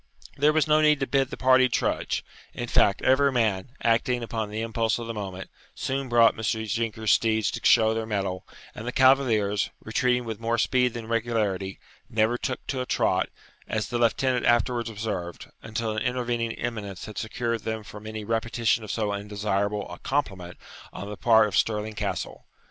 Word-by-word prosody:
There 145 +2 +4
was 155 -1 +2
no 155 0 +4
need 150 -1 +4
to - - +2
bid 135 0 +1
the - - -7
party 130 0 +5
trudge. - - -1 0.3
In 120 - -4
fact, 100 -4 +3
every 140 +2 +4
man, 110 -5 0
acting 120 +1 +2
upon 110 -2 -3
the 110 +1 -4
impulse 115 0 0
of 120 - -5
the 115 - -4
moment, 95 -3 -6 0.2
soon 135 0 -3
brought 120 -1 +5
Mr. 110 0 -1
Jinker's 110 -1 -1
steeds 110 -1 +2
to - - -5
show 110 -1 +5
their 110 0 -3
mettle, 95 -4 -2 0.3
and 115 - -8
the - - -1
cavaliers, 120 -7 +3
retreating 125 +2 0
with 110 -2 -5
more 115 +1 0
speed 125 0 +2
than 115 -1 -5
regularity, 105 -5 -1 0.3
never 110 0 +2
took - - -4
to 130 -2 -2
a - - -3
trot, - - +1 0.4
as 110 -1 -2
the 120 -1 -1
lieutenant 125 +2 +2
afterwards 120 0 +2
observed, 105 -6 -5
until 110 0 -3
an 105 - -2
intervening 120 -2 -1
eminence 105 -6 -5
had 105 -3 -6
secured 115 +1 -2
them 110 0 -4
from 105 +1 -10
any 110 0 -5
repetition 115 +1 0
of 105 - -9
so 105 -1 -1
undesirable 100 0 -2
a 90 - -8
compliment 95 -11 -3 0.3
on 100 +2 -7
the - - -5
part 110 0 +5
of 100 - -4
Stirling 110 0 0
Castle. - - -4
115 Hz, 180 wpm, -26 LUFS, 105-120 Hz, 0.4 s, party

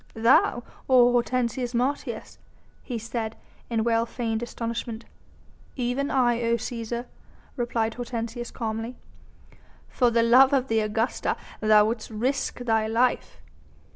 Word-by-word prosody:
"Thou, 235 +1 +4 0.3
O 245 -2 +6
Hortensius 245 0 0
Martius?" 260 +4 -2 0.4
he 245 - -5
said, 225 0 -4 0.3
in 225 -2 0
well 230 0 +1
feigned 225 -2 -2
astonishment. 230 -1 -5 0.7
"Even 255 +2 -1
I, 240 -2 +2
O 235 0 +2
Cæsar!" 235 +1 -4 0.5
replied 235 -3 -1
Hortensius 240 0 -5
calmly. 225 +1 -4 0.9
"For 245 -2 +2
love 235 +4 +5
of 265 -1 +1
the 225 0 +2
Augusta 220 +2 -1 0.2
thou 215 -1 +5
wouldst 220 0 -3
risk 250 +4 -2
thy 225 -2 +1
life?" 240 +3 0
235 Hz, 115 wpm, -26 LUFS, 225-245 Hz, 0.9 s, O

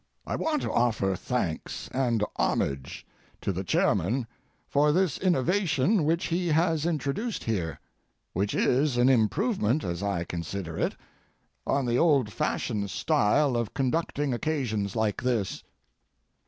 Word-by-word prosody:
I - - -2
want 310 -2 -1
to - - -2
offer 110 -5 +2
thanks 90 -8 -3
and 120 -5 0
homage 70 -1 -1 0.4
to - - -1
the 95 +1 -3
chairman 110 +7 +1 0.4
for 150 +1 +3
this 180 -1 +1
innovation 180 - +2
which 165 +3 +1
he 175 +1 0
has 165 0 +2
introduced 170 - -2
here, 85 -10 -2 0.5
which 100 +3 -1
is 130 0 +2
an 125 +2 +5
improvement, 135 - +2
as 85 0 -3
I 100 -4 -1
consider 85 0 -5
it, - - -1 0.7
on 140 -1 +1
the 120 0 +1
old 140 - +3
fashioned 100 +2 -1
style 140 +2 +2
of 120 -3 -2
conducting 140 0 0
occasions 120 - -1
like 110 -3 0
this. 120 -6 -1
125 Hz, 130 wpm, -27 LUFS, 100-155 Hz, 0.7 s, an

